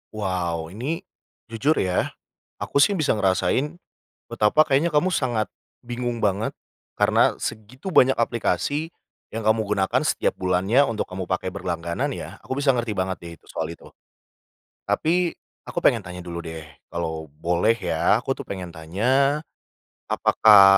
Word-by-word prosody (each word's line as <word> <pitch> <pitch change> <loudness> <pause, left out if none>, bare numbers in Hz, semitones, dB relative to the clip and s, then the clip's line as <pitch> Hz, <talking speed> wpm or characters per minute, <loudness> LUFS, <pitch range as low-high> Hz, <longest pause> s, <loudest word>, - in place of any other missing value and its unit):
Wow, 85 -5 -2
ini 145 - -3 0.5
jujur 140 +8 +2
ya, 90 -1 +1 0.5
aku - - -6
sih - - +4
bisa 155 - +1
ngerasain 105 - +1 0.5
betapa 110 +9 +3
kayaknya 150 +4 +3
kamu 150 +5 +3
sangat 120 -5 0 0.3
bingung 120 -1 -3
banget, 100 +1 +1 0.5
karena - - +3
segitu 115 - -6
banyak 135 -9 +5
aplikasi 120 - 0 0.4
yang 110 -1 -3
kamu 110 0 +3
gunakan 100 -2 +1
setiap - - +1
bulannya 95 +8 +3
untuk 115 -6 -2
kamu 95 0 -5
pakai 95 +1 -2
berlangganan, 85 -3 -2
ya? - - -6
Aku - - -11
bisa 140 -2 +3
ngerti 120 -2 -1
banget 95 -1 -1
deh 85 - -7
itu - - -27
soal 80 0 -4
itu. 85 - -12 1.0
Tapi, 175 +2 +1 0.3
aku - - -3
pengen - - +3
tanya 90 +1 -7
dulu, 85 -1 -6
deh. 80 -2 -7 0.2
Kalau 80 -2 -3
boleh 85 +8 +2
ya, - - +2
aku - - -2
tuh - - -7
pengen 95 -2 -5
tanya, 120 - +1 0.7
apakah 105 -3 +7
105 Hz, 145 wpm, -24 LUFS, 90-130 Hz, 1.0 s, apakah